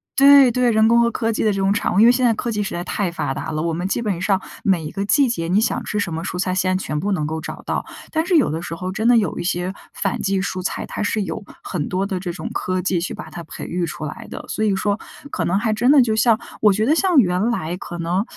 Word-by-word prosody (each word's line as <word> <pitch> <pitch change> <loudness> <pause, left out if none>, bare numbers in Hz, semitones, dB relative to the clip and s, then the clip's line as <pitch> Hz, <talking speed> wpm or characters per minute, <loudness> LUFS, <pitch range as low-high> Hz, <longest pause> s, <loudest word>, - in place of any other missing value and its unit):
对 275 -1 +7
对 250 0 +2
人 220 0 +4
工 235 +1 +5
和 235 - +3
科 225 0 -1
技 220 - -1
的 215 - +3
这 195 - -2
种 195 +1 +2
产 205 - -1
物。 195 - +4
因 225 - +7
为 240 - +8
现 250 +1 0
在 235 - +4
科 235 +2 -3
技 210 -2 -1
实 200 - -3
在 175 - -3
太 190 0 -2
发 135 - -2
达 160 - -5
了， 155 0 -2
我 170 -1 -1
们 175 +3 -2
基 235 - -1
本 200 -6 -2
上， 195 0 +2 0.2
每 185 -5 +2
一 150 - -5
个 195 - -3
季 275 +5 +4
节 165 -8 -2
你 190 +4 +3
想 225 - 0
吃 210 - -2
什 185 -5 -2
么 160 - -3
蔬 180 - -4
菜， 185 0 -1
现 185 0 +1
在 190 - -5
全 150 0 -2
部 200 +4 -1
能 155 -5 -1
够 160 +1 -3
找 - - -7
到。 - - -2 0.3
但 320 0 +1
是 370 - +2
有 295 - +4
的 160 +2 -3
时 165 - -5
候 185 +2 -4
真 220 +4 -1
的 245 -1 +6
有 200 -7 0
一 - - -3
些 180 +1 -1 0.2
反 195 -1 -2
季 195 0 0
蔬 185 -1 -3
菜， 180 - -3
它 - - -6
是 210 0 0
由 190 +4 -5 0.2
很 155 -7 -3
多 190 +2 0
的 190 -2 -3
这 180 -1 -4
种 - - -6
科 185 0 -1
技 185 -2 0
去 170 - -4
把 - - -9
它 175 - -7
培 - - -8
育 175 0 -2
出 155 -1 -6
来 150 - -7
的。 - - -7
所 215 - -2
以 205 -2 +2
说， 205 +2 0 0.3
可 165 - -1
能 175 +3 +1
还 215 +1 0
真 240 +4 +2
的 290 - +7
就 225 -3 +1
像 220 +1 +3 0.2
我 210 - +6
觉 215 +3 +1
得 295 - +4
像 355 -1 +2
原 190 0 +3
来 170 -7 -2
可 175 -1 -7
能 175 +4 0
195 Hz, 325 characters per minute, -21 LUFS, 175-225 Hz, 0.3 s, 为